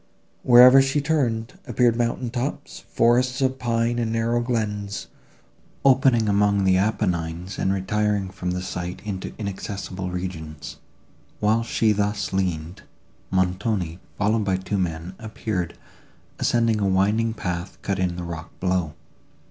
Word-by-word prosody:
Wherever 125 Hz, +2 st, +8 dB
she 135 Hz, +2 st, +1 dB
turned, 130 Hz, -6 st, 0 dB
appeared 120 Hz, -2 st, +3 dB
mountain 120 Hz, +1 st, -1 dB
tops, 120 Hz, -, -4 dB
forests 125 Hz, +3 st, +3 dB
of 130 Hz, -1 st, 0 dB
pine 120 Hz, 0 st, 0 dB
and 115 Hz, -1 st, -1 dB
narrow 115 Hz, +1 st, +1 dB
glens, 105 Hz, -4 st, -2 dB, 0.8 s
opening 130 Hz, -4 st, +4 dB
among 100 Hz, -1 st, +3 dB
the 95 Hz, -1 st, +4 dB
Apennines 90 Hz, -3 st, -1 dB
and 95 Hz, -, +1 dB
retiring 100 Hz, 0 st, 0 dB
from 90 Hz, -1 st, -4 dB
the 90 Hz, 0 st, -2 dB
sight 90 Hz, -1 st, -5 dB
into 95 Hz, -3 st, -4 dB
inaccessible 100 Hz, -2 st, -5 dB
regions. 80 Hz, -5 st, -6 dB, 0.6 s
While 110 Hz, +2 st, +2 dB
she 115 Hz, -1 st, +1 dB
thus 105 Hz, -1 st, -1 dB
leaned, 90 Hz, -3 st, -2 dB, 0.5 s
Montoni, 95 Hz, -1 st, 0 dB, 0.2 s
followed 105 Hz, +2 st, +1 dB
by 95 Hz, -2 st, +1 dB
two 95 Hz, +2 st, -2 dB
men, 85 Hz, 0 st, -3 dB
appeared, 110 Hz, -5 st, -4 dB, 0.6 s
ascending 115 Hz, -2 st, +2 dB
a 100 Hz, -, +1 dB
winding 105 Hz, +4 st, +2 dB
path, 90 Hz, -2 st, -4 dB
cut 100 Hz, -1 st, -1 dB
in 90 Hz, -2 st, 0 dB
the 90 Hz, -, -5 dB
rock 85 Hz, -2 st, -6 dB
below. 90 Hz, -4 st, 0 dB
100 Hz, 130 wpm, -24 LUFS, 90-115 Hz, 0.8 s, Wherever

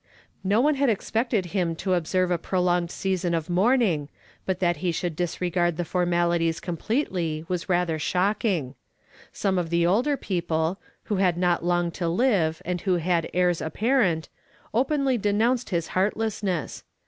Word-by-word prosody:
No 205 Hz, +4 st, +3 dB
one 300 Hz, +3 st, +3 dB
had 280 Hz, -2 st, +2 dB
expected 225 Hz, -1 st, 0 dB
him 175 Hz, -4 st, 0 dB
to 185 Hz, +3 st, -1 dB
observe 180 Hz, +1 st, +1 dB
a 175 Hz, -, +1 dB
prolonged 180 Hz, -1 st, 0 dB
season 180 Hz, -2 st, -1 dB
of 165 Hz, +1 st, -3 dB
mourning, 190 Hz, -, +2 dB, 0.4 s
but 185 Hz, -1 st, -1 dB
that 175 Hz, -2 st, +1 dB
he 180 Hz, -2 st, -1 dB
should 170 Hz, 0 st, -3 dB
disregard 175 Hz, 0 st, -1 dB
the 175 Hz, -, -2 dB
formalities 170 Hz, -1 st, +1 dB
completely 170 Hz, -, -2 dB
was 180 Hz, 0 st, -3 dB
rather 175 Hz, -3 st, +1 dB
shocking. 180 Hz, -, 0 dB, 0.6 s
Some 190 Hz, -2 st, 0 dB
of 170 Hz, -2 st, -3 dB
the 170 Hz, 0 st, +2 dB
older 245 Hz, +11 st, +2 dB
people, 170 Hz, -2 st, -1 dB, 0.2 s
who 205 Hz, -, -2 dB
had 180 Hz, -3 st, +2 dB
not 175 Hz, -1 st, +1 dB
long 175 Hz, 0 st, +1 dB
to 170 Hz, 0 st, -3 dB
live 175 Hz, -6 st, +1 dB
and 180 Hz, 0 st, -2 dB
who 185 Hz, -2 st, +1 dB
had 170 Hz, 0 st, 0 dB
heirs 180 Hz, -1 st, +1 dB
apparent, 190 Hz, -, +1 dB, 0.5 s
openly 265 Hz, +1 st, +1 dB
denounced 225 Hz, +5 st, +1 dB
his 170 Hz, -3 st, -1 dB
heartlessness. 200 Hz, -3 st, -1 dB
180 Hz, 150 wpm, -25 LUFS, 170-205 Hz, 0.6 s, No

